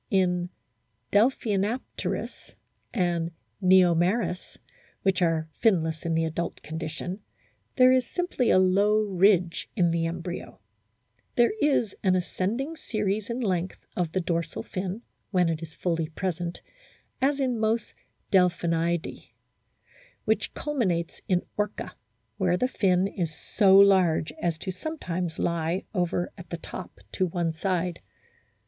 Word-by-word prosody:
* - - -49
In 180 -1 -1 0.6
Delphinapterus 215 0 0 0.4
and 175 -5 0 0.3
JVeomeris, 185 +2 +3 0.5
which 190 -1 +2
are 165 -2 +2 0.2
finless 165 -7 +2
in 165 - +1
the 165 0 +2
adult 165 +1 -4
condition, 160 +4 -5 0.6
there 255 0 +7
is 255 -1 +3
simply 355 -9 0
a - - +6
low 200 +3 +4
ridge 185 -3 +2
in 175 -6 +3
the 165 0 +1
embryo. 170 +1 -6 0.8
There 240 - +4
is 260 -8 +2
an 185 -1 +3
ascending 230 - -2
series 210 -3 -2
in 235 +2 -2
length 185 -4 -2
of 175 -3 -1
the 185 - 0
dorsal 170 -1 -2
fin, 190 +4 -4 0.3
when 180 -4 +2
it 160 -1 -2
is 160 -1 -9
fully 165 -3 -1
present, 175 0 -3 0.6
as 280 +1 +2
in 255 -4 0
most 220 +1 0 0.4
Delphinidae, 170 -2 +1 1.0
which - - 0
culminates 195 - -1
in 180 -2 +2
Orca, 210 0 -3 0.4
where 180 -3 +2
the 250 - +1
fin 190 -6 +2
is 170 -5 -3
so 195 -3 +4
large 190 -6 +5
as 170 -2 0
to 190 +3 -4
sometimes 180 - -4
lie 170 +2 0
over 175 -2 -1
at 175 - -11
the 170 - -4
top 180 +2 -8
to 185 - 0
one 170 -1 -1
side. 175 0 -1
185 Hz, 130 wpm, -27 LUFS, 170-210 Hz, 1.0 s, there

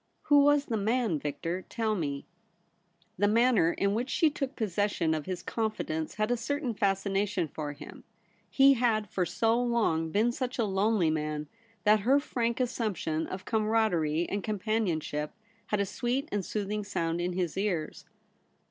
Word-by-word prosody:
* - - -45
Who 290 -1 +7
was 290 0 +4
the 225 - -1
man, 220 -5 +1
Victor? 165 +5 -3
Tell 225 -2 0
me.' 145 -8 -3 0.9
The 205 - +4
manner 225 -6 +4
in 200 0 0
which 240 +5 -2
she 315 +2 +3
took 275 -1 -4
possession 205 -6 0
of 155 0 -3
his 185 -2 -4
confidence 215 -8 -2
had 215 +2 0
a 245 - +2
certain 265 +1 -2
fascination 195 -2 0
for 150 -1 -5
him. - - -11 0.5
He 275 0 +6
had 230 -4 +1
for 180 -2 0
so 230 +1 +1
long 220 -10 +1
been 215 +7 +2
such 255 0 -3
a 235 - +2
lonely 195 -3 +2
man, 150 -1 -2 0.4
that 210 0 +5
her 260 +8 +4
frank 235 -4 -2
assumption 210 -10 -1
of 185 0 -7
cainaraderie 210 -8 +1
and 200 -1 -3
companionship 190 -8 -1 0.3
had 210 - 0
a 200 - +2
sweet 250 +8 -2
and 205 -2 -1
soothing 210 +2 -3
sound 170 -4 -2
in 180 +1 -1
his 175 -2 -2
ears. 185 -6 -2
205 Hz, 165 wpm, -29 LUFS, 170-235 Hz, 0.9 s, Who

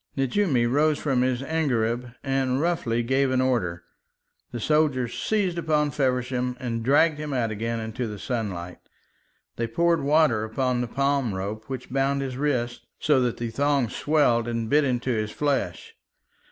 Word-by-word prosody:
Nejoumi 135 -2 +2
rose 145 +5 +2
from 135 -4 0
his 130 0 0
angareb 125 -6 -1
and 135 -1 0
roughly 150 -8 0
gave 130 +3 +2
an 130 0 +1
order. 100 -10 0 0.7
The 120 - -4
soldiers 140 -3 +1
seized 195 -5 0
upon 150 -3 +1
Feversham 125 -2 -1
and 115 -2 -3
dragged 145 +4 +3
him 150 -2 -4
out 115 -4 0
again 115 +2 -2
into 110 +2 -4
the 105 -1 -6
sunlight. 95 -7 -4 0.8
They 115 - -1
poured 170 +6 +2
water 140 -6 +3
upon 125 +3 -1
the 125 - -2
palm 135 -3 0
rope 105 +3 -4
which 130 -2 -6
bound 135 +1 +1
his 130 -2 -4
wrists, 125 -4 -1
so 145 -4 +3
that 120 -2 0
the 115 -1 -4
thongs 140 -3 +1
swelled 140 -7 +2
and 115 -1 -2
bit 150 +1 +5
into 125 -1 0
his 110 -2 -1
flesh. 145 +4 -2
130 Hz, 160 wpm, -25 LUFS, 115-145 Hz, 0.8 s, bit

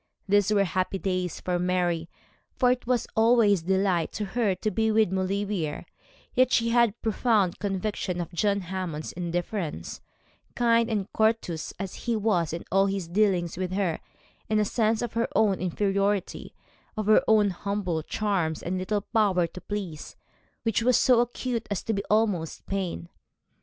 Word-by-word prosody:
Those 205 0 +3
were 205 -2 +4
happy 185 +1 -1
days 185 -3 -2
for 180 -1 -1
Mary, 175 -2 0 0.5
for 250 -2 +3
it 250 -1 -2
was 245 -2 +1
always 220 -4 +4
delight 190 -1 +1
to 210 - -3
her 205 -1 0
to 215 +4 -2
be 220 0 +1
with 215 -3 +3
Maulevrier; 190 -4 -2 0.5
yet 255 0 +3
she 230 0 +2
had 235 0 +4
a 210 - -19
profound 215 -4 +1
conviction 195 -2 -2
of 170 0 -4
John 200 +2 +1
Hammond's 180 -4 -4
indifference, 175 - -4 0.5
kind 230 -1 +3
and 210 -4 -1
courteous 220 -7 0
as 195 -2 -5
he 235 -1 -2
was 200 -7 +1
in 165 - -5
all 195 +2 +4
his 195 -3 -2
dealings 180 -3 +1
with 185 0 -3
her, 190 -4 0 0.5
and 215 0 +2
a 210 - +2
sense 220 +1 +1
of 240 - -4
her 230 +1 0
own 200 -4 +3
inferiority, 195 +2 -1 0.4
of 215 - -1
her 215 +1 +5
own 210 -2 +4
humble 185 -3 -2
charms 175 -3 -1
and 185 +2 -2
little 205 +2 -1
power 195 -5 +2
to 175 +2 -9
please, 190 -7 -6 0.5
which 225 -1 +1
was 245 0 +4
so 250 -2 +4
acute 240 -1 -2
as 205 -3 -2
to 225 - -1
be 200 -1 -2
almost 205 -7 0
pain. 180 - -3
200 Hz, 165 wpm, -26 LUFS, 180-220 Hz, 0.5 s, her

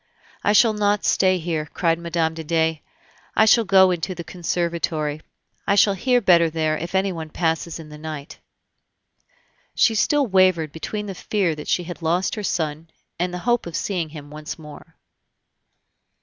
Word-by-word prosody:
"I 205 - +3
shall 220 +1 +5
not 205 -1 +1
stay 185 -1 +3
here," 160 -3 -3
cried 165 +1 0
Mme. 170 -1 0
de 160 0 -7
Dey; 160 -1 0 0.5
"I 220 - +5
shall 225 +1 +5
go 190 -1 +5
into 180 +1 -3
the 170 - -6
conservatory; 165 -3 -2 0.5
I 200 - +3
shall 200 0 +5
hear 250 +6 +2
better 170 -5 +5
there 155 -1 0
if 170 +4 -5
anyone 185 -5 -1
passes 165 0 -1
in 160 -2 -11
the 150 0 -11
night." 155 -2 -8 1.4
She 225 - +4
still 285 +6 +2
wavered 185 - +3
between 210 +7 -5
the 195 - -5
fear 190 -2 -1
that 150 -1 -9
she 175 - +1
had 175 0 -8
lost 170 +3 0
her 215 - -4
son 160 -4 -3 0.3
and 180 +1 0
the 180 - -4
hope 240 -5 +1
of 170 - -6
seeing 175 -2 -2
him 150 -2 -11
once 150 0 -7
more. 150 -2 -13
170 Hz, 170 wpm, -22 LUFS, 160-195 Hz, 1.4 s, shall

